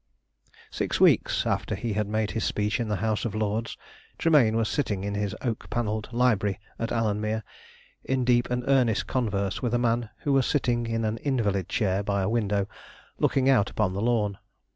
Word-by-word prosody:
Six - - -2
weeks - - +4
after - - -1
he 115 -3 -3
had 105 0 -1
made 110 0 -1
his 115 - -2
speech 105 +3 0
in 115 - -1
the 105 - 0
House 110 -2 0
of 110 -3 -3
Lords, 110 +2 -2 0.4
Tremayne 145 -9 +4
was 115 -1 +1
sitting 105 -6 -1
in 100 0 -2
his 100 0 -2
oak 115 -3 -3
panelled 110 -2 -2
library 110 -5 +1 0.2
at 115 - -2
Alanmere, 110 0 -1 0.6
in 130 -1 0
deep 120 -1 +3
and 125 0 -1
earnest 130 -5 +2
converse 100 -6 -1
with 120 -1 0
a - - +4
man 120 -1 0
who 145 - +1
was 135 -2 +3
sitting 120 -4 +1
in 115 0 -1
an 110 +1 -2
invalid 105 - 0
chair 100 -3 +1
by 100 -1 -1
a 95 - 0
window 105 -3 0 0.5
looking 135 -1 +2
out 125 -7 +4
upon 105 -4 0
the 100 - -3
lawn. 110 -4 0
110 Hz, 185 wpm, -26 LUFS, 105-120 Hz, 0.6 s, weeks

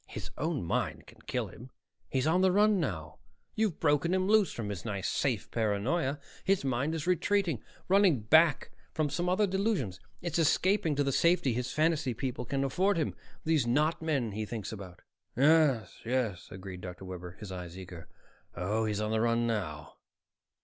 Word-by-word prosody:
"His - - -7
own 155 -1 -1
mind 85 - -2
can - - -17
kill - - -2
him! 125 +3 -12 0.4
He's 130 0 0
on 170 +4 +3
the 190 0 +4
run 205 +1 +4
now; 80 - -4 0.3
you've 215 -6 0
broken 155 +3 +2
him 185 0 +1
loose 210 -2 +4
from 110 -3 -5
his 95 -4 -5
nice 100 -4 -3
safe 120 -8 -1
paranoia. 125 +8 0 0.2
His 195 -6 +1
mind 135 +5 0
is 160 -1 -3
retreating, 180 - +1 0.3
running 190 - +4
back 155 +7 +4 0.2
to 155 -1 +1
some 175 +5 -1
other 195 +3 +3
delusions. 190 - -1 0.2
It's 170 -1 -1
escaping 165 +1 +2
to 145 - +2
the 135 - 0
safety 170 -3 +3
his 125 +2 -2
fantasy 155 -5 +1
people 125 0 -3
can 135 +3 -1
afford 185 +8 +1
him, 160 - 0 0.3
these 155 -6 +2
not 150 +7 +2
men 140 -8 0
he 110 +2 -3
thinks 110 -1 -5
about." 100 -5 -9 0.3
"Yes, 140 - +3
yes," 115 -7 -1
agreed 95 -1 -8
Dr. 90 +1 -8
Webber, 90 -1 -7
his 105 -3 -8
eyes 90 -1 -7
eager. 90 -3 -9 0.5
"Oh, 105 +6 0
he's 105 -1 -1
on 105 0 -1
the 110 0 +1
run 115 0 +2
now." 95 -10 -3
135 Hz, 175 wpm, -30 LUFS, 105-165 Hz, 0.5 s, the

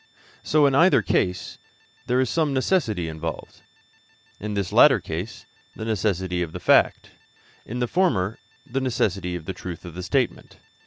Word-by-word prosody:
So, 150 -1 +3
in 140 - +3
either 165 - +5
case, 90 0 -1 0.5
there 125 +1 +2
is 130 - +2
some 150 +1 0
necessity 125 - 0
involved 80 0 -6 0.8
in 105 0 -4
this 100 -3 -2
latter - - +7
case, 90 +6 -6 0.3
the 110 - -6
necessity 95 -5 -1
of 85 -2 -4
the - - -5
fact; - - +3 0.6
in 120 - -5
the 120 -1 0
former, 115 - 0 0.3
of 130 - -21
the 95 -9 -1
truth 90 -1 -8
of 85 - -8
the 90 - -6
statement. 120 +7 -2
105 Hz, 150 wpm, -24 LUFS, 90-130 Hz, 0.8 s, latter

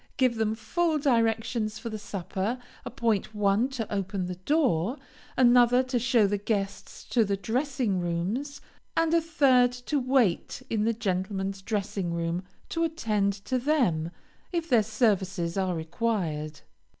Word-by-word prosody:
Give 255 -4 +2
them 220 0 0
full 315 +9 0
directions 230 -4 +1
for 230 - -6
the 215 - -5
supper, 200 +3 -3 0.3
appoint 220 -2 -1
one 210 +4 +2
to 235 -6 -4
open 195 -1 -2
the 180 0 -4
door, 235 - +1 0.4
another 245 0 +5
to 255 -1 -1
show 235 -2 +3
the 205 0 0
guests 200 -1 -3
to 235 - +3
the 200 -1 -1
dressing 245 -2 -1
rooms, 190 +12 -2 0.4
and 330 0 +2
a 335 - +4
third 270 -6 +4
to 250 +4 -2
wait 255 -3 +1
in 215 -1 +1
the 230 - +2
gentlemen's 195 -1 -2
dressing 200 -4 -2
room, 170 +2 -2 0.3
to 330 - -1
attend 215 -12 0
to 255 -1 0
them, 240 - +1 0.4
if 340 -2 -2
their 240 -6 +5
services 195 -5 0
are 190 -2 0
required. 160 -3 -2
220 Hz, 145 wpm, -27 LUFS, 195-255 Hz, 0.4 s, another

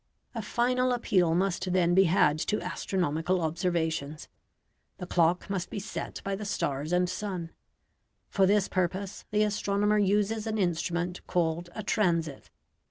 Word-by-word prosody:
A 230 - -3
final 250 +3 +1
appeal 185 -8 +2
must 185 0 0
then 175 -2 +3
be 190 +2 +6
had 155 -3 +3
to 210 +6 0
astronomical 180 -1 -1
observations. 160 -3 -2 0.7
The 180 - -6
clock 175 0 +2
must 195 -3 -3
be - - -6
set 200 0 -5
by 195 0 -2
the 205 - -6
stars 145 -6 -2
and 180 0 +2
sun. 180 -4 -4 0.8
For 195 -1 +2
this 205 0 +3
purpose 185 +2 -2
the 210 0 +2
astronomer 210 0 +1
uses 210 +2 +1
an 220 0 -1
instrument 175 -1 -1
called 170 0 0
a 215 - -4
"transit." 170 -8 0
185 Hz, 145 wpm, -28 LUFS, 170-205 Hz, 0.8 s, be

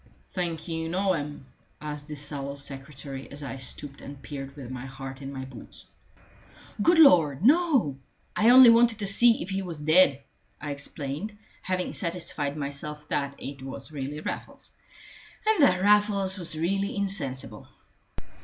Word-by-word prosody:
"Think 170 -3 -3
you 165 -1 -3
know 190 +2 +1
him?" 145 -4 -5 0.3
asked 150 -1 -6
the 150 - -6
sallow 140 -1 -5
secretary, 140 -1 -6
as 145 +1 -9
I 135 -1 -5
stooped 135 +2 -3
and 140 0 -9
peered 135 -1 -8
with 130 -4 -8
my 130 0 -6
heart 135 0 -8
in 135 0 -6
my 130 -1 -6
boots. 130 -2 -12 1.0
"Good 340 +10 +4
Lord, 175 - +6
no! 270 - +3 0.4
I 220 +2 +4
only 250 -1 +10
wanted 230 -1 +4
to 210 - -3
see 230 +4 +5
if 190 - -8
he 195 0 -1
was 170 -5 -5
dead," 150 -2 +4 0.4
I 145 0 -5
explained, 145 +7 -5 0.2
having 185 -1 -2
satisfied 165 -4 -3
myself 150 +1 -5
that 140 -1 -1
it 140 -1 -8
was 135 +3 -7
really 145 +1 -5
Raffles, - - -7 0.7
and 435 -5 +3
that 185 -9 +4
Raffles 205 -2 +3
was 170 -4 -4
really 195 +5 -1
insensible. 140 - -2
150 Hz, 155 wpm, -27 LUFS, 140-195 Hz, 1.0 s, only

